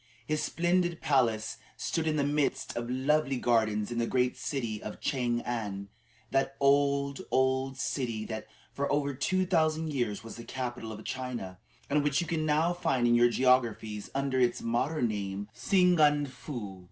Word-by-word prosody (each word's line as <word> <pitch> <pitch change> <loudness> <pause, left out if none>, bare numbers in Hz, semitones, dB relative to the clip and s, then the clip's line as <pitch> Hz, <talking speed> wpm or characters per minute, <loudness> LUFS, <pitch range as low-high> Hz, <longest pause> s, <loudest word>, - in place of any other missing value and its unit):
His 155 +4 0
splendid 175 0 +1
palace 115 -6 +1 0.2
stood 160 -1 -1
in 155 - +1
the 145 - +2
midst 145 0 0
of 120 0 -3
lovely 135 +2 +1
gardens 110 -3 +1
in 120 - -2
the 115 - +1
great 125 -1 +1
city 115 -7 -3
of 105 - -7
Chang 120 -3 0
an, 100 -5 -4 0.4
that 135 0 +1
old, 140 0 +2
old 130 0 +1
city 120 -5 -2
that 110 -1 -5 0.3
for 140 0 -1
over 145 -1 +1
two 185 +8 0
thousand 160 -3 +1
years 120 -6 -1
was 115 - -9
the 115 - -8
capital 120 -2 -5
of 110 0 -8
China, 120 -8 -5 0.3
and 145 +1 +2
which 145 -1 +2
you 175 - -1
can 160 -1 -1
now 155 +3 +3
find 130 -8 +1
in 120 - +4
your 120 0 +6
geographies 120 -4 +1
under 135 -1 0
its 125 -1 +2
modern 120 +4 0
name 100 -1 -4
of - - -32
Singan 155 -1 +4
foo. 120 -6 -7
130 Hz, 170 wpm, -30 LUFS, 115-145 Hz, 0.4 s, your